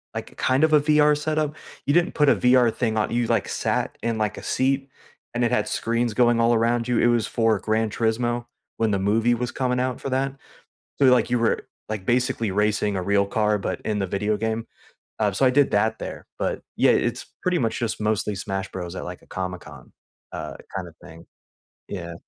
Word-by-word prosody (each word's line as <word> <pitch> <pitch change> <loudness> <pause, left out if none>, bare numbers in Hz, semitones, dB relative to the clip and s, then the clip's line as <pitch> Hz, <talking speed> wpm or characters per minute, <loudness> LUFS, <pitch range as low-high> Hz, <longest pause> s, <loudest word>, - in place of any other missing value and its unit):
like, - - -6
kind 130 +4 +2
of 155 -1 +4
a 150 - +7
VR 150 0 +4
setup? 155 0 -1 0.3
You 145 - +2
didn't 175 0 +2
put 150 -2 +4
a - - +5
VR 125 -2 +4
thing 110 -1 -1
on, 105 - 0
you, 120 -1 0
like, 115 -4 +1
sat - - -1
in, 115 -1 -1
like, 105 -1 -1
a - - -8
seat, 135 +1 0 0.5
and 120 - +1
it 120 - +2
had 125 - +1
screens 115 -1 -1
going 120 -1 +4
all 115 +1 +4
around 115 +1 +1
you; 120 -2 +1
it - - +3
was 120 -2 +2
for 115 -3 +1
Gran 110 0 0
Turismo 120 +2 0 0.3
when 110 -1 +1
the 100 - +2
movie 110 +4 +2
was 120 +1 -3
coming 125 -1 -1
out 130 -1 -2
for 135 - -3
that, 135 +1 -1 0.6
so, 140 - +5
like, 125 -2 +4
you 125 - +2
were, 115 - +1 0.2
like, 105 -3 -4
basically 125 -3 +1
racing 105 0 +1
a - - -1
real 100 0 +2
car 105 0 +1
but - - -3
in 105 -2 -1
the 95 - -1
video 105 +3 0
game, 110 +1 -2 0.5
um, 105 -2 +1
so 135 - +2
I - - +6
did 145 +1 +3
that 110 +2 +2
there, - - -7
but, - - -1 0.2
yeah, - - +5
it's - - 0 0.2
pretty 180 -1 +1
much 115 -3 -1
just 115 -2 -2
mostly 105 -1 0
Smash 95 -1 -4
Bros. 90 -1 -6
at, - - -5
like, 90 0 -8
a - - -20
Comic 90 -1 -5
Con, - - -13 0.4
uh, - - -6 0.2
kinda 90 -3 -5
thing. 80 -1 -13 0.6
Yeah. 85 -3 -6
115 Hz, 215 wpm, -24 LUFS, 105-125 Hz, 0.6 s, a